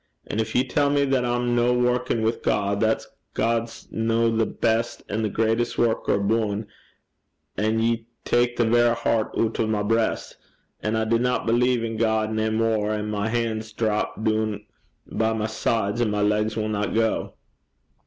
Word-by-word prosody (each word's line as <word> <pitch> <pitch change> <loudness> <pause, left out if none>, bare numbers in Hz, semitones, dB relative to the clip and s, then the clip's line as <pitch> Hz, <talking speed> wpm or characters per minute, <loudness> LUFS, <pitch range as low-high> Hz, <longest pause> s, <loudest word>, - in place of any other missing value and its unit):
An' 105 - -3
gin 110 - +1
ye 130 +1 +3
tell 145 +2 +2
me 140 0 +2
that 135 -2 +1
I'm 120 0 0
no 120 +1 +3
workin' 125 -2 +1
wi' 110 +1 +2
God, 100 0 0
that 110 +1 +1 0.3
God's 115 0 -1
no 115 0 +1
the 110 0 +2
best 115 +1 -1
an' 105 +2 -2
the 110 - 0
greatest 115 +3 0
worker 115 -1 +1
aboon 105 +1 0 0.9
a', 105 +3 0
ye 115 +1 0 0.2
tak 120 0 +2
the 120 - +2
verra 120 +1 +4
hert 115 -1 0
oot 115 -1 0
o' 110 - +2
my 105 -1 0
breist, 115 +2 0 0.4
and 110 +1 -1
I 110 - +1
dinna 120 +3 +1
believe 120 +1 +2
in 115 -1 -3
God 110 -1 +1
nae 110 0 0
mair, 110 -1 +1
an' 105 0 -3
my 105 +1 -1
han's 110 -1 -2
drap 110 -1 -1
doon 110 -1 0 0.4
by 110 0 0
my 110 -1 -1
sides, 110 0 -1
an' 115 - +2
my 105 0 0
legs 105 +1 +1
winna 105 -1 -1
gang. 110 0 0
110 Hz, 175 wpm, -24 LUFS, 110-115 Hz, 0.9 s, verra